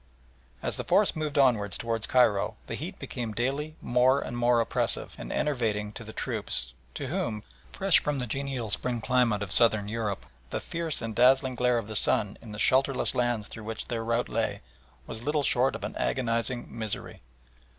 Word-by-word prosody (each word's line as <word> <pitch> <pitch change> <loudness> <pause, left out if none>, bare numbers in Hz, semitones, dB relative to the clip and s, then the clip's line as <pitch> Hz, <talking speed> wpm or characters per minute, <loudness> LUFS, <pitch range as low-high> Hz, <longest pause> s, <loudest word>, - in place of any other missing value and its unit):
As - - -1
the - - -3
force - - +3
moved 155 -2 -2
onwards 115 -7 +3
towards 115 -2 -1
Cairo 110 -6 +3
the - - -6
heat - - -5
became 115 -3 -5
daily 140 +7 -2
more 125 +3 +4
and 120 - -5
more 120 0 +3
oppressive 115 - 0
and - - -6
enervating 110 -7 0
to 115 - -7
the 110 - -8
troops, - - -2 0.2
to - - -4
whom, 105 -2 -2 0.3
fresh 195 -3 +4
from 150 -1 -1
the 125 - -2
genial 130 -2 -3
spring 120 +1 +1
climate 120 -4 +2
of 100 - -7
Southern 110 -2 +4
Europe, 105 -2 -3 0.2
the - - -2
fierce 165 -6 -3
and 115 -1 -3
dazzling 130 +1 +4
glare 125 0 +2
of 115 -3 -3
the 110 - -6
sun 105 0 +1
in 110 - -10
the 105 - -7
shelterless 130 +3 +3
lands 120 -4 0
through 110 - -9
which 110 0 -5
their 115 -2 -2
route 115 +1 0
lay, - - -1 0.4
was 110 - -7
little 150 +3 0
short 130 0 +3
of - - -7
an - - -4
agonising 120 -1 -1
misery. 110 -3 -4
120 Hz, 185 wpm, -28 LUFS, 110-130 Hz, 0.4 s, more